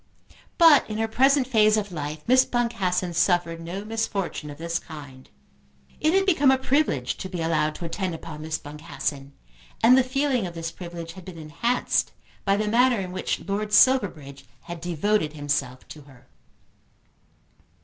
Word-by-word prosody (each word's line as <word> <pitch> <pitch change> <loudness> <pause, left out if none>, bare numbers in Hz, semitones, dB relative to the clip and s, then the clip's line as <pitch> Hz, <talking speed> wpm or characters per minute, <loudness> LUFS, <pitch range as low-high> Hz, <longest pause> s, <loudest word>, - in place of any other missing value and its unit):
But 325 -7 +6
in 215 - -4
her 225 0 0
present 270 +4 +3
phase 215 -4 +4
of 205 -2 -3
life 150 -2 -5
Miss 255 +1 +5
Boncassen 190 -8 -1
suffered 170 -1 +1
no 180 +5 -6
misfortune 205 -8 -3
of 145 - -9
this 170 +1 -2
kind. 140 -5 -12 0.7
It 310 +4 +2
had 385 0 +3
become 305 -8 +4
a 265 - +5
privilege 260 - 0
to 190 - -6
be 180 -2 -5
allowed 155 -2 0
to 170 - -6
attend 180 +1 -3
upon 155 -2 -9
Miss 155 0 -3
Boncassen, 145 -2 -6 0.5
and 240 +3 +7
the 265 - +5
feeling 260 -4 0
of 170 - -9
this 165 0 -4
privilege 170 -2 -8
had 185 - -12
been 185 -3 -9
enhanced 165 +11 -1 0.3
by 195 0 +2
the 215 0 -1
manner 240 +1 +3
in 185 -2 -5
which 185 +1 -3
Lord 205 +1 -2
Silverbridge 165 - +3 0.2
had 170 -1 -8
devoted 175 0 0
himself 145 -4 -3
to 150 - -10
her. 135 -3 -19
180 Hz, 165 wpm, -25 LUFS, 155-230 Hz, 0.7 s, and